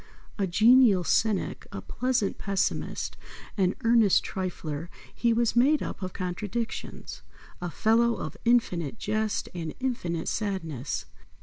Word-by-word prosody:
A 195 Hz, -, +1 dB
genial 220 Hz, 0 st, +6 dB
cynic, 205 Hz, +5 st, 0 dB
a -, -, -5 dB
pleasant 250 Hz, -5 st, -1 dB
pessimist, 195 Hz, -1 st, -2 dB, 0.4 s
an 190 Hz, -2 st, +2 dB
earnest 230 Hz, -4 st, +4 dB
trifler, 170 Hz, -4 st, -4 dB, 0.2 s
he 235 Hz, -, +1 dB
was 230 Hz, 0 st, +2 dB
made 280 Hz, +5 st, +4 dB
up -, -, -6 dB
of 185 Hz, -1 st, -3 dB
contradictions. 205 Hz, +6 st, -4 dB, 0.4 s
A 175 Hz, -, -2 dB
fellow 230 Hz, +5 st, +3 dB
of -, -, -6 dB
infinite 225 Hz, -7 st, +1 dB
jest 215 Hz, 0 st, -1 dB
and 165 Hz, -3 st, -5 dB
infinite 180 Hz, -11 st, -2 dB
sadness. 165 Hz, -, -3 dB
205 Hz, 120 wpm, -27 LUFS, 180-235 Hz, 0.4 s, genial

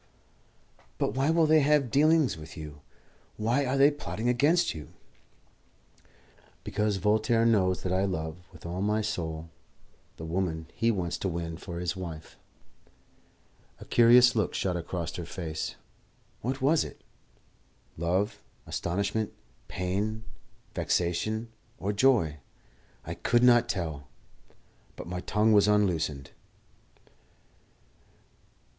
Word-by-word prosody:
"But -, -, 0 dB
why 135 Hz, +3 st, +1 dB
will 165 Hz, 0 st, +4 dB
they 155 Hz, 0 st, +5 dB
have 145 Hz, -4 st, +2 dB
dealings 155 Hz, 0 st, +4 dB
with 80 Hz, +1 st, -11 dB
you? 75 Hz, -2 st, -9 dB, 0.6 s
Why 120 Hz, +6 st, +1 dB
are 130 Hz, +2 st, 0 dB
they 140 Hz, +2 st, +6 dB
plotting 120 Hz, -6 st, -4 dB
against 145 Hz, +8 st, +3 dB
you?" 75 Hz, -4 st, -10 dB, 1.7 s
"Because 105 Hz, -1 st, 0 dB
Voltaire 110 Hz, +3 st, +2 dB
knows 95 Hz, -5 st, +2 dB
that 90 Hz, -, -1 dB
I 95 Hz, +1 st, +2 dB
love, 80 Hz, -4 st, -3 dB
with -, -, -15 dB
all 90 Hz, +2 st, -4 dB
my 105 Hz, +2 st, +1 dB
soul, 80 Hz, -6 st, -4 dB, 0.7 s
the 80 Hz, -, -7 dB
woman 80 Hz, -1 st, -2 dB
he 115 Hz, -, +1 dB
wants 90 Hz, -6 st, -1 dB
to -, -, -2 dB
win 85 Hz, -1 st, -4 dB
for 85 Hz, +1 st, -7 dB
his 90 Hz, +1 st, -2 dB
wife." 85 Hz, -4 st, -8 dB, 1.4 s
A -, -, -10 dB
curious 120 Hz, +1 st, +6 dB
look 110 Hz, -4 st, 0 dB
shot 90 Hz, -2 st, -1 dB
across 85 Hz, 0 st, -4 dB
her 85 Hz, -, -5 dB
face. 80 Hz, -4 st, -4 dB, 0.7 s
What 130 Hz, +3 st, -3 dB
was 155 Hz, +4 st, +4 dB
it? -, -, -11 dB, 0.9 s
Love, 95 Hz, +6 st, -1 dB, 0.2 s
astonishment, 100 Hz, +5 st, -2 dB, 0.4 s
pain, 100 Hz, +4 st, -2 dB, 0.5 s
vexation, 110 Hz, +6 st, -1 dB, 0.3 s
or 100 Hz, +2 st, -2 dB
joy? 100 Hz, -, +3 dB, 0.7 s
I -, -, -4 dB
could 120 Hz, 0 st, +1 dB
not 120 Hz, -1 st, +5 dB
tell; 80 Hz, -7 st, -3 dB, 0.9 s
but -, -, -8 dB
my 90 Hz, +1 st, -4 dB
tongue 105 Hz, +4 st, +2 dB
was 105 Hz, -1 st, +5 dB
unloosed. 85 Hz, -9 st, +1 dB
100 Hz, 120 wpm, -28 LUFS, 85-120 Hz, 1.7 s, they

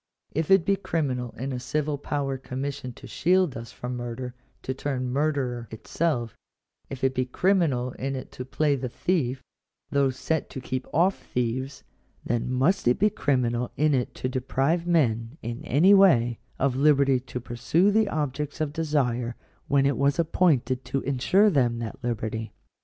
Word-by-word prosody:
If 160 Hz, 0 st, -2 dB
it 195 Hz, -3 st, +5 dB
be 200 Hz, 0 st, +2 dB
criminal 130 Hz, -10 st, -2 dB
in 135 Hz, +2 st, -3 dB
a 125 Hz, -, -3 dB
civil 145 Hz, +3 st, -2 dB
power 140 Hz, -2 st, -2 dB
commissioned 130 Hz, -1 st, -5 dB
to -, -, -12 dB
shield 180 Hz, +4 st, +2 dB
us 115 Hz, 0 st, -7 dB
from 125 Hz, 0 st, -5 dB
murder 120 Hz, +1 st, -5 dB, 0.3 s
to 130 Hz, -, -2 dB
turn 130 Hz, -2 st, -3 dB
murderer 135 Hz, -5 st, -1 dB
itself; 120 Hz, 0 st, -2 dB, 0.5 s
if 135 Hz, -1 st, -7 dB
it 130 Hz, 0 st, +3 dB
be 130 Hz, -, +1 dB
criminal 140 Hz, -4 st, +1 dB
in 135 Hz, +2 st, -4 dB
it 130 Hz, -, -7 dB
to 125 Hz, -, -6 dB
play 145 Hz, +3 st, +1 dB
the 130 Hz, -2 st, -4 dB
thief, 135 Hz, -3 st, -1 dB, 0.5 s
though 140 Hz, -1 st, +3 dB
set 150 Hz, +5 st, -2 dB
to 135 Hz, -, -6 dB
keep 130 Hz, 0 st, -4 dB
off 180 Hz, +5 st, +2 dB
thieves; 130 Hz, +3 st, -3 dB, 0.4 s
then 120 Hz, +1 st, -1 dB
must 135 Hz, +6 st, +2 dB
it 120 Hz, -, +4 dB
be 210 Hz, +1 st, +3 dB
criminal 125 Hz, -, 0 dB
in 150 Hz, +1 st, +3 dB
it 125 Hz, -3 st, -1 dB
to -, -, -3 dB
deprive 135 Hz, +6 st, 0 dB
men, 120 Hz, -6 st, +1 dB
in 115 Hz, +1 st, -5 dB
any 170 Hz, +10 st, +5 dB
way, 120 Hz, -, +5 dB, 0.2 s
of 135 Hz, -1 st, +1 dB
liberty 140 Hz, -2 st, +4 dB
to 125 Hz, 0 st, -6 dB
pursue 120 Hz, -, +1 dB
the 215 Hz, 0 st, +3 dB
objects 150 Hz, -2 st, -3 dB
of 150 Hz, -2 st, -1 dB
desire, 125 Hz, -7 st, 0 dB, 0.3 s
when 140 Hz, -1 st, +3 dB
it 140 Hz, -, +2 dB
was 140 Hz, 0 st, +2 dB
appointed 145 Hz, -7 st, +2 dB
to 135 Hz, -, -2 dB
ensure 185 Hz, +11 st, +3 dB
them 125 Hz, -6 st, +2 dB
that 115 Hz, +2 st, -6 dB
liberty. 110 Hz, -1 st, -3 dB
135 Hz, 170 wpm, -26 LUFS, 125-155 Hz, 0.5 s, it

